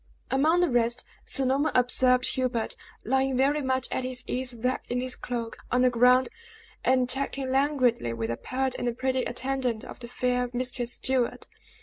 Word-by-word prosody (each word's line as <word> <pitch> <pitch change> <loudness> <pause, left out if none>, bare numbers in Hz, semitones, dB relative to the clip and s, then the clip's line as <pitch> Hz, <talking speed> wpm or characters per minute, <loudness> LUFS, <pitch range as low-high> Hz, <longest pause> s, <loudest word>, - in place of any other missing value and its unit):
Among 315 +6 +3
the 355 - +3
rest 240 +1 +1 0.2
Sir 270 - +4
Norman 275 +4 +1
observed 250 0 +3
Hubert, 250 -3 -1 0.3
lying 265 +1 +1
very 285 +3 +2
much 260 -1 -1
at 260 - -1
his 255 0 -3
ease 255 0 -1
wrapped 250 +3 -2
in 245 - -1
his 255 0 -1
cloak, 235 -2 -5
on 250 +1 +3
the 255 - +4
ground, 250 +2 +4 0.5
and 255 -1 +3
chatting 270 +1 -1
languidly 260 - +2
with 115 0 -3
a 115 - -3
pert 260 0 -2
and 240 -1 -2
pretty 260 0 0
attendant 250 -2 -2
of - - -10
the 240 - -8
fair 250 0 -1
Mistress 245 -1 -2
Stuart. 255 -2 -1
255 Hz, 170 wpm, -27 LUFS, 245-265 Hz, 0.5 s, Sir